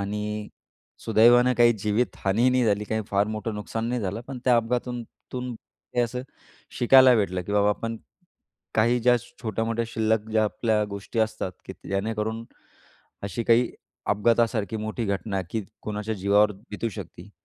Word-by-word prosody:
आणि 105 +1 -3 0.6
सुदैवानं 120 +3 +5
काही 120 0 +6
जीवितहानी 105 +1 +1
नाही 125 -1 +3
झाली, 105 -1 +1
काही 110 +1 -2
फार 100 +1 +2
मोठं 110 +1 -4
नुकसान 110 +2 -4
नाही 125 0 -1
झालं 100 +2 -3
पण 135 - -5
त्या 125 -2 +5
अपघातातून 120 +1 -1 0.3
तून 125 -1 -4 0.4
हे - - +4
असं 120 +1 -2 0.6
शिकायला 130 +1 +7
भेटलं, 95 -4 0
की 100 - -5
बाबा 105 0 +3
आपण 115 +2 -2 0.8
काही 120 +2 +3
ज्या 125 +1 +5 0.3
छोट्या-मोठ्या 115 +1 -1
शिल्लक 110 -1 0
ज्या 110 0 +3
आपल्या 110 0 0
गोष्टी 100 +3 -6
असतात 110 -4 -1
की - - -7 0.2
जेणेकरून, 110 +3 -2 0.8
अशी 100 +4 -3
काही 120 +1 +4 0.4
अपघातासारखी 110 0 +1
मोठी 110 +2 -3
घटना, 100 0 -2
की 110 - -2 0.2
कोणाच्या 105 +1 -3
जीवावर 100 +2 +3 0.2
बितू 105 +2 -2
शकती, 100 -2 -9
110 Hz, 150 wpm, -25 LUFS, 105-120 Hz, 0.8 s, शिकायला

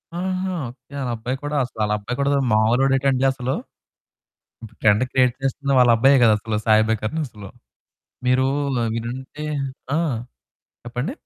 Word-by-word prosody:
ఆహా! 185 +1 -2 0.2
ఓకే. 130 +3 -17
ఆళ్ళ 130 -3 -2
అబ్బాయి 125 +4 -4
కూడా 145 +1 -3
అసలాళ్ళబ్బాయి 105 0 -2
కూడా 140 0 +2
మామూలోడేటండి 130 +4 +3
అసలు. 130 0 -3 1.3
ట్రెండ్ 105 +3 +4
క్రియేట్ 130 -2 +3
చేస్తున్న 140 +1 -2
వాళ్ళ 125 -1 +6
అబ్బాయే 135 +4 +5
కదా! 110 - +6
అసలు. 110 0 -3
సాయి 110 -1 +5
అభ్యాంకర్ 110 +3 -2
అసలు 105 -4 -11 0.8
మీరు 130 +1 +3 0.5
వినుంటే 130 +6 -6 0.5
ఆ! - - +2 0.9
చెప్పండి. 125 - -3
125 Hz, 125 wpm, -22 LUFS, 110-135 Hz, 1.3 s, వాళ్ళ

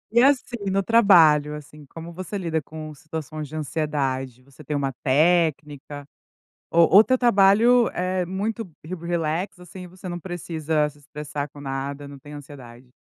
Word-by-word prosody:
E, 235 - +7
assim, 245 -6 +1
no 195 +1 +1
trabalho, 165 -9 +5
assim, 150 -1 -12
como 165 +3 -10
você 185 +4 -5
lida 165 -4 -2
com 155 +1 -9
situações 155 0 -7
de 155 - -10
ansiedade? 135 -4 -3
Você 140 +3 -16
tem 150 +1 -3
uma 135 -1 -2
técnica? 150 -1 +1 0.7
Ou 170 0 +5
ou 205 +5 +8
teu 255 +2 +2
trabalho 235 +1 +5
é, 185 0 -2
muito 205 +5 -3 0.2
re 185 - -5
relax, 170 +1 -3
assim, 180 +1 -10
você 185 +1 -11
não 175 -1 -4
precisa 160 -4 -2
se 145 0 -13
estressar 145 0 -6
com 145 - -13
nada, 140 +1 -5
não 140 0 -10
tem 145 +2 -14
ansiedade? 130 -4 -12
155 Hz, 160 wpm, -23 LUFS, 145-185 Hz, 0.7 s, ou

